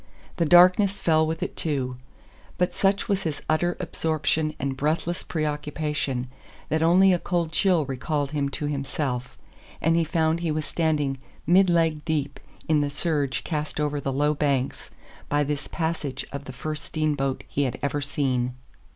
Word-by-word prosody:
The 170 - +2
darkness 185 +4 +6
fell 160 -1 +3
with 160 +1 -2
it - - -4
too. 135 -5 -1 0.6
But 180 - +1
such 195 +2 +1
was 200 -3 +1
his 160 -5 -3
utter 175 +3 +1
absorption 155 -2 0
and 135 0 -2
breathless 160 +5 -1
preoccupation 150 -4 -2 0.4
that 160 +1 +1
only 185 +3 +6
a 175 - +1
cold 170 -3 -1
chill 175 -2 +3
recalled 140 +2 -2
him 145 -2 0
to 145 +2 -4
himself, 135 -3 -3 0.4
and 165 +1 +2
he 170 - +3
found 160 0 +1
he 170 -1 -1
was 155 0 -1
standing 150 -5 0 0.3
mid 185 +3 +5
leg 165 -3 +2
deep 150 -4 -2 0.3
in 155 -2 +3
the 145 - 0
surge 145 -2 -1
cast 150 -2 -3
over 145 -1 0
the 135 - -2
low 145 +3 +2
banks 140 -3 -1 0.4
by 145 0 +2
this 145 0 -3
passage 160 -5 -3
of 140 0 -6
the 130 - -7
first 155 +4 -4
steamboat 145 -4 -1
he 145 - 0
had 125 - -2
ever 145 +1 0
seen! 130 -3 -1
150 Hz, 165 wpm, -25 LUFS, 140-165 Hz, 0.6 s, darkness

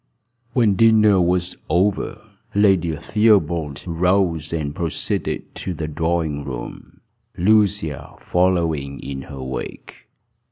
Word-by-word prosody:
When 115 -6 +3
dinner 105 -2 +5
was 90 0 0
over, 95 +5 +1 0.4
Lady 95 -6 +3
Theobald 85 -8 +1
rose, 85 -2 +1
and 75 -3 -2
proceeded 80 0 -3
to 90 - -5
the 80 0 -4
drawing 80 -1 -1
room, - - -8 0.4
Lucia 105 +1 +1
following 85 -6 0
in 70 -1 -6
her 70 -2 -7
wake. 65 -1 -7
85 Hz, 105 wpm, -21 LUFS, 80-95 Hz, 0.4 s, dinner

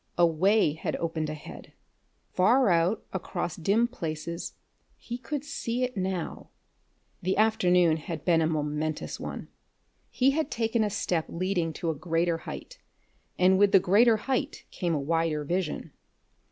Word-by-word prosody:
A 175 - +6
way 175 +1 +3
had 160 - -3
opened 160 -2 -2
ahead; 155 -1 -9 0.6
far 235 +6 +4
out 175 +5 +2
across 175 -2 -3
dim 205 +8 +2
places 170 -6 -5 0.4
he 240 - -6
could 290 +2 -4
see 240 -2 -2
it 250 0 -2
now. 185 -3 -3 0.7
The 185 +2 0
afternoon 180 -6 +4
had 160 -1 -6
been 165 -2 +4
a 160 - +2
momentous 155 0 -2
one. - - -6 0.6
He 265 +2 +3
had 310 0 -1
taken 225 -1 0
a 210 - 0
step 180 -5 -1
leading 180 -1 -1
to 165 +1 -2
a - - -5
greater 165 +1 0
height, - - -8 0.6
and 185 +1 +4
with 205 0 +4
the 195 - +8
greater 220 +5 +4
height 270 +5 -2
came 175 -3 -1
a - - 0
wider 160 +1 0
vision. 175 +2 -2
180 Hz, 150 wpm, -28 LUFS, 165-220 Hz, 0.7 s, the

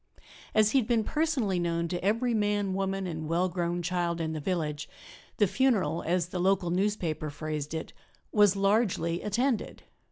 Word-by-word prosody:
As 215 0 +5
he 270 - +4
had 225 - -2
been 235 -3 +2
personally 260 - 0
known 170 -1 0
to 175 0 -3
every 230 +5 +1
man, 205 -2 +1
woman 195 0 -1
and 160 -3 -4
well 175 +3 +2
grown 175 0 -2
child 175 -1 -1
in 160 -1 -2
the 155 - -3
village, 150 -3 -2 0.5
the 210 - +5
funeral, 195 - +1
as 175 0 +1
the 180 - -4
local 185 -1 +2
newspaper 180 -5 -1
phrased 150 +1 -4
it, 160 - -5 0.4
"was 205 -2 +5
largely 195 -4 +1
attended." 235 +4 -1
185 Hz, 165 wpm, -29 LUFS, 170-210 Hz, 0.5 s, As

